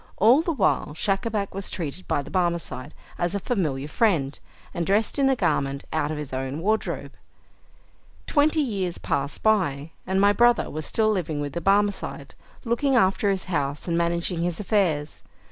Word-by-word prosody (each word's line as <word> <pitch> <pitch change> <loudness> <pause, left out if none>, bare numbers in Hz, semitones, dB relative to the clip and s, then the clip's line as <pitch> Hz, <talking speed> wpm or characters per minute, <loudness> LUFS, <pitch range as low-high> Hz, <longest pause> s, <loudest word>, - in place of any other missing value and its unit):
All 235 +9 +6
the 335 - -1
while 200 - 0
Schacabac 200 +3 -1
was 195 +1 -4
treated 170 0 -5
by 145 - 0
the - - -11
Barmecide 170 -6 -1 0.3
as 175 +2 0
a - - 0
familiar 155 - -1
friend, 150 -7 +1 0.3
and 170 - -1
dressed 205 - +1
in 270 -1 +4
a 265 - +3
garment 140 - 0
out 145 - 0
of 155 - -3
his 150 -3 -6
own 130 +2 -3
wardrobe. 215 +6 -1 1.1
Twenty 305 +1 +3
years 195 -10 -2
passed 140 0 -2
by, 165 -9 +1 0.2
and 190 0 +1
my 200 +1 +5
brother 240 +2 +3
was 155 0 -4
still 215 -1 +2
living 165 -7 -2
with 145 -1 -4
the 170 - -3
Barmecide, 200 +2 0 0.3
looking 260 +4 +1
after 200 -2 +3
his 195 -1 0
house, 145 -4 -2
and 170 - 0
managing 170 0 0
his 170 -1 -1
affairs. 180 -8 0
185 Hz, 170 wpm, -25 LUFS, 150-215 Hz, 1.1 s, All